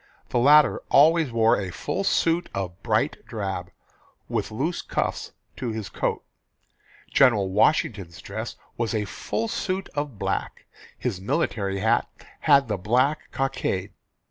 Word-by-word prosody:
The 120 - +1
latter 145 +4 +6
always 160 -1 +5
wore 115 0 +3
a 95 -2 -4
full 190 - -3
suit 170 -2 +1
of 95 -1 -4
bright - - 0
drab, 95 -4 -4 0.6
with - - -2
loose 150 +11 -2
cuffs - - -2 0.3
to 125 - -3
his 110 -2 -4
coat. - - -2 0.9
General 110 -8 +4
Washington's 100 - +1
dress - - -6 0.2
was 115 0 -1
a 105 -1 0
full 225 - -3
suit 190 -2 -3
of 145 -6 -4
black. - - -3 0.3
His 100 -7 -3
military 100 - -1
hat - - +2 0.3
had 140 -3 +4
the 105 -2 -1
black 125 +10 +1
cockade. 105 -8 -2
115 Hz, 135 wpm, -25 LUFS, 100-150 Hz, 0.9 s, latter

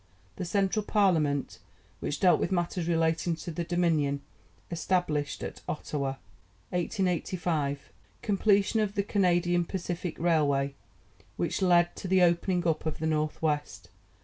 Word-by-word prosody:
The - - -3
Central 200 +3 +1
Parliament, 165 -10 +1 0.4
which 145 - -3
dealt 180 -2 +5
with - - -1
matters 175 -1 -1
relating 165 0 +1
to 170 +1 -7
the 170 +2 -3
Dominion, 160 -5 +1 0.5
established 165 -4 -1
at - - -6
Ottawa. 140 -3 -2 0.6
1885. 175 -5 -1 0.3
Completion 205 +1 +2
of 210 -1 0
the 200 - +1
Canadian 175 -3 +2
Pacific 175 -1 -4
Railway, 145 -5 +2 0.6
which 170 +3 -1
led 175 -2 +4
to - - -5
the 185 0 +4
opening 175 +1 +2
up 160 0 0
of 155 - -2
the 160 - -3
North 155 -1 0
West. 150 -2 -2
175 Hz, 130 wpm, -29 LUFS, 155-185 Hz, 0.6 s, dealt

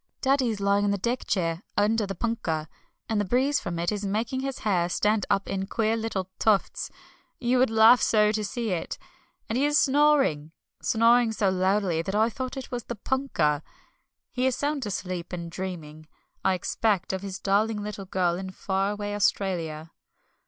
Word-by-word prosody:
Daddy 270 -2 +2
is 215 -2 -3
lying 200 0 +2
in - - +2
the 200 - +1
deck 240 +6 -2
chair 165 -3 0 0.2
under 210 +1 +2
the 195 - -4
punkah, 170 -8 -2 0.4
and 215 -2 +1
the - - 0
breeze 260 +8 +2
from 170 -1 -4
it 170 +3 0
is 210 -1 -3
making 220 +6 -1
his 270 0 -3
hair 175 -4 +2
stand 210 +3 +1
up 195 - +1
in 195 0 -3
queer 220 +1 0
little 220 -5 -3
tufts 210 -3 +1 0.5
you 245 0 +2
would 255 - +4
laugh 225 +2 +6
so 210 -1 +4
to 215 0 -1
see 225 +1 -3
it 175 - -3 0.5
and 230 +3 -1
he 280 - +3
is 295 0 +3
snoring! 270 - +3 0.3
Snoring 230 +1 +4
so 205 -3 +1
loudly 185 -2 +1
that 190 +4 -4
I 220 +2 +3
thought 260 +3 -5
it 265 - -7
was 245 -2 -4
the 240 - -5
punkah. 205 - 0 0.7
He 255 +1 0
is 260 - +1
sound 285 -4 -2
asleep, 180 -3 -4
and 170 -2 -5
dreaming, 160 -4 -7 0.4
I 190 -1 +3
expect, 190 +1 0
of 190 - -3
his 195 -1 -5
darling 210 +2 +1
little 210 -2 -6
girl 180 -2 0
in 190 0 -5
far 190 +1 -1
away 205 0 -4
Australia. 170 -6 -1
205 Hz, 185 wpm, -26 LUFS, 185-235 Hz, 0.7 s, laugh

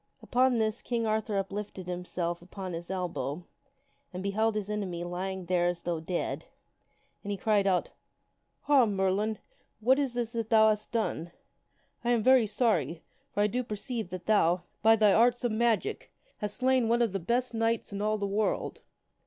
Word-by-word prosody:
Upon 255 0 +3
this, 220 0 0
King 235 -2 -1
Arthur 215 -1 0
uplifted 195 -1 -4
himself 175 -1 -3
upon 185 +1 -7
his 170 +1 -6
elbow 180 -4 -3 0.7
and 185 0 -6
beheld 215 +2 +1
his 210 -2 -2
enemy 195 -5 -3
lying 185 +1 -4
there 175 0 +2
as 175 -1 -2
though 170 -2 -1
dead, 170 +2 -3 0.8
and 200 - -6
he 200 - -1
cried 205 0 +2
out, 185 -2 +1 0.4
" - - -48
Ha! 275 -5 +5
Merlin! 200 +2 0 0.4
what 255 +5 +4
is 270 -4 -1
this 235 -2 -2
that 230 -2 -3
thou 220 -1 +6
hast 210 0 -1
done? 215 -7 -1 0.7
I 240 - 0
am 235 -3 +2
very 255 -3 +5
sorry, 175 - 0 0.3
for 205 - +1
I - - +4
do 245 +4 -1
perceive 225 -1 -4
that 185 -1 -7
thou, 180 -4 +3 0.2
by 225 +1 +6
thy 210 -2 +5
arts 245 +2 +4
of 240 - +1
magic, 235 - 0 0.3
hath 210 - -2
slain 255 +2 +2
one 235 +1 +3
of 230 - 0
the 195 - -2
best 240 +7 0
knights 225 -2 0
in 200 - -3
all 215 +1 +1
the 205 - -2
world." 205 +2 -1
210 Hz, 180 wpm, -29 LUFS, 185-230 Hz, 0.8 s, thou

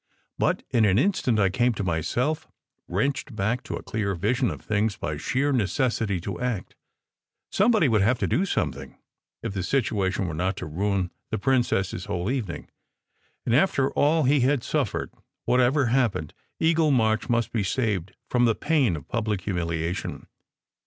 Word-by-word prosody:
But - - +1
in 115 - +3
an 95 -1 +3
instant 135 - +2
I 100 -2 +4
came 120 +6 +2
to 100 - -3
myself, 120 - -1 0.4
wrenched 120 +6 -1
back 110 +4 0
to - - -4
a - - -7
clear 100 -3 -2
vision 115 +7 +1
of 75 -5 -6
things 105 -1 0
by 75 - -3
sheer 130 - 0
necessity 115 -3 0
to 95 -1 -5
act. 120 -7 -2 0.8
Some 205 +5 +3
body 215 -10 +4
would 110 -4 +3
have 120 +6 +3
to - - -1
do 195 +4 +1
something, - - -3 0.5
if 115 -4 -3
the 95 - -2
situation 100 -5 0
were 85 - -4
not 90 +4 -1
to - - -5
ruin 95 +3 -1 0.2
the 110 - -1
princess 120 -5 +1
s 90 - -5
whole 100 +1 -2
evening; 115 -11 -4 0.8
and 115 - +2
after 135 -3 +3
all 155 +2 +3
he 140 +2 +4
had 130 0 +2
suffered, - - -1 0.3
whatever 130 +3 +3
happened, 115 - +1 0.3
Eagle 160 -1 +3
March 110 -5 +2
must 115 -2 +1
be 115 - 0
saved 100 -4 -1
from 120 -1 +2
the 115 -2 +3
pain 145 - +2
of 75 - -9
public 110 -4 -1
humiliation. 85 -2 -3
110 Hz, 170 wpm, -25 LUFS, 95-130 Hz, 0.8 s, I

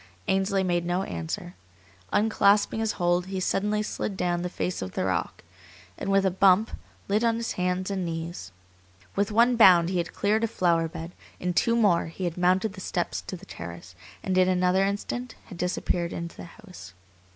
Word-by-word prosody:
Ainsley 195 0 +1
made 175 -2 0
no 175 +2 -1
answer. 85 - -5 0.6
Unclasping 210 0 +3
his 220 -1 0
hold, 175 0 +1
he 190 0 -3
suddenly 210 +3 0
slid 205 -2 -4
down 175 -1 0
the 180 - -3
face 180 0 -3
of 95 -1 -5
the - - -1
rock, 95 -3 -2 0.5
and - - -5
with 195 0 +3
a 190 - +3
bump 190 +3 +4 0.4
lit 210 +3 +1
on 230 -1 +3
his 230 0 -3
hands 180 +1 -1
and 190 -2 -2
knees. 165 - -5 0.6
With 200 +1 0
one 235 +3 +4
bound 180 -6 +7
he 185 -1 0
had 170 - -3
cleared 215 +2 +1
a - - +3
flower 170 -6 +1
bed. 165 +1 -7 0.3
In 180 0 -1
two 230 +6 +2
more 200 -9 +3
he 165 +3 -7
had 175 -2 -2
mounted 185 +3 +2
the 190 - -9
steps 175 -1 -2
to 185 - -5
the 185 - -14
terrace, 85 - -9 0.3
and 190 - -1
in 185 0 +4
another 185 +1 +2
instant 215 +5 -3
had 185 -6 -11
disappeared 175 -1 -1
into 170 0 -6
the - - -9
house. 185 - -13
185 Hz, 190 wpm, -26 LUFS, 175-200 Hz, 0.6 s, bound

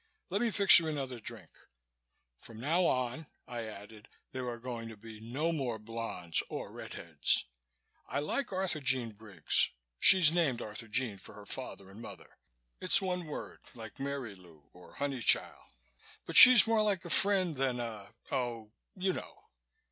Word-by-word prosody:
"Let 200 +3 0
me 240 - +1
fix 200 -2 +7
you 165 - -4
another 135 -5 -4
drink. 110 -6 -9 0.9
From 115 -1 -13
now 165 +8 +1
on," 130 +4 -2 0.2
I 120 -2 -5
added, 105 0 -11 0.2
"there 130 -1 -5
are 120 - -5
going 115 -1 -7
to 110 - -11
be 110 0 -12
no 135 +9 -2
more 130 -8 -3
blondes 105 -6 -3
or - - -6
red - - -9
heads. 80 -4 0 0.6
I - - -2
like 195 - -2
Arthurjean 135 -11 -1
Briggs 100 -6 0 0.3
she's 185 -5 +7
named 165 -8 0
Arthurjean 110 0 -3
for 100 - -14
her 105 0 -12
father 100 -5 -8
and 105 +4 -12
mother. - - -12 0.4
It's - - +3
one 180 -2 -3
word 150 - -8 0.2
like 110 -2 -10
Marylou 100 - -7
or 90 - -17
Honeychile 140 -4 0 0.5
but - - -7
she's 255 -2 +10
more 225 -1 +2
like 200 -4 0
a 170 - -6
friend 190 -4 +3
than 130 -2 -1
a 110 -4 -6 0.2
oh 120 -5 -3 0.2
you 190 0 -1
know. 415 - -9
125 Hz, 155 wpm, -31 LUFS, 110-165 Hz, 0.9 s, she's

